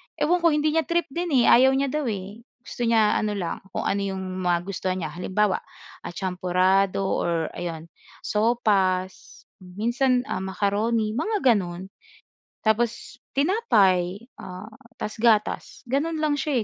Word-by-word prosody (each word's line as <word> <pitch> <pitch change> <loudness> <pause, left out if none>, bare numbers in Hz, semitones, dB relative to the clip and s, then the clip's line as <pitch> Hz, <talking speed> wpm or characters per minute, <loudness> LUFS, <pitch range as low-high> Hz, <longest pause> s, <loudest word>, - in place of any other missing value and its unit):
ewan 355 +3 +2
ko 335 -2 +3
hindi 300 +1 +2
niya 320 +1 +1
trip 340 0 +1
din 345 +4 -2 0.2
eh, - - +3
ayaw 265 +2 +6
niya 275 -1 0
daw 300 -3 -1
eh. 200 0 -5 0.2
Gusto 240 - -4
niya 220 -2 +3
ano 210 -1 -1
lang 175 -4 -3 0.2
kung - - -1
ano 200 - 0
'yong 190 -1 -3 0.2
magustuhan 185 +1 -1
niya 155 - -4
halimbawa, 190 +4 0 0.4
ah, - - -7
champorado 185 +1 +1 0.2
or 165 -2 -1
ayun 165 -2 -6 0.3
sopas, 200 -5 0 0.2
minsan, 240 +7 0
ah, - - -1
macaroni 210 +3 0
mga 315 - +2
gano'n. 185 -1 -4 0.7
Tapos 235 +2 -1 0.2
tinapay 205 - +2 0.2
ah, 185 +3 -8 0.3
tas 215 - -5
gatas. 225 0 +1
Gano'n 305 +5 -1
lang 305 -1 +1
siya 280 -1 0
210 Hz, 140 wpm, -24 LUFS, 185-255 Hz, 0.7 s, ayaw